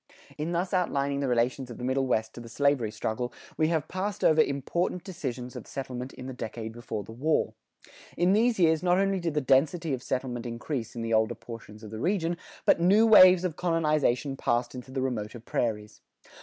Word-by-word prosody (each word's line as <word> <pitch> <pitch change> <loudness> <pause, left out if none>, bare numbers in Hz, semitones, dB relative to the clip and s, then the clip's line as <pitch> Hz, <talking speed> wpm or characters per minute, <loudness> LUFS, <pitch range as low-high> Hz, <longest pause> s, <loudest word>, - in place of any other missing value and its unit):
In 155 +3 -3
thus 175 +2 -1
outlining 140 -6 0
the 140 - -1
relations 125 +1 0
of 120 - -8
the - - -8
Middle 130 +1 0
West 110 -3 0
to 120 - -9
the 115 - -10
slavery 140 -2 +1
struggle, 110 +3 -3 0.2
we 155 - +2
have 160 -3 0
passed 190 +2 -3
over 155 0 +6
important 170 +7 -1
extensions 130 -9 -5
of - - -8
settlement 130 -1 -5
in 125 - -9
the 130 - -5
decade 115 -2 -6
before 115 -2 -5
the - - -11
war. 145 +8 0 0.6
In 175 +3 +3
these 230 +3 +3
years, 160 -3 +3
not 180 0 +3
only 195 0 +1
did 165 -3 -2
the 150 - +2
density 145 +4 +2
of 130 - -3
settlement 125 -2 -3
increase 120 +1 -4
in 115 - -4
the 115 0 -1
older 110 -1 +2
portions 110 -2 -11
of 105 - -9
the 110 - -6
region, 175 - 0 0.3
but - - +4
new 200 +6 +5
waves 185 -5 +8
of 180 -4 -2
colonization 150 -6 +1
passed 120 -2 0
into 125 0 -9
the 130 0 -2
remoter 120 -2 -3
prairies. 110 -2 -3
135 Hz, 200 wpm, -28 LUFS, 120-170 Hz, 0.6 s, waves